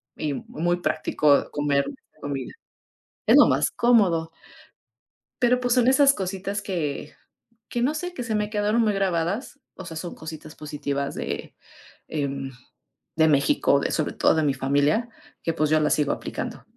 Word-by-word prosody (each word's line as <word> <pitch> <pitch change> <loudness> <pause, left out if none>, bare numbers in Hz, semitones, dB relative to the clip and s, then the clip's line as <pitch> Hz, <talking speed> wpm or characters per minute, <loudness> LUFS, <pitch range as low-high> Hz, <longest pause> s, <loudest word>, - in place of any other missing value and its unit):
y 150 -2 -2
muy 175 +5 -2
práctico 150 -3 +2
comer 145 -1 +1 0.4
comida. 140 -2 -4 0.7
Es - - +6
lo - - +8
más - - +2
cómodo. 185 -9 +3 1.1
Pero, 250 +1 +4
pues, 245 -1 +1
son 250 0 +3
esas 275 +1 +6
cositas 195 0 -3
que 155 -7 -3 0.6
que 240 - -1
no 280 +5 +2
sé, 355 +3 -5
que 250 - -4
se 225 -2 -3
me 210 0 0
quedaron 210 +2 +1
muy 215 -2 +2
grabadas. 195 - -1
O 190 - -9
sea, 165 -1 -8
son 175 +2 -5
cositas 155 -1 -9
positivas 145 -2 -3
de, - - -5 0.6
em, 140 -3 -3 0.7
de 160 0 +5
México, 140 -1 +3
de - - -1
sobre 155 - -1
todo - - +3
de 160 - +1
mi 140 -2 +2
familia, 145 - +1 0.3
que, 165 - 0
pues, 155 -2 0
yo 155 0 +4
las 150 - +2
sigo 150 -2 +1
aplicando. - - -6
165 Hz, 160 wpm, -24 LUFS, 145-215 Hz, 1.1 s, lo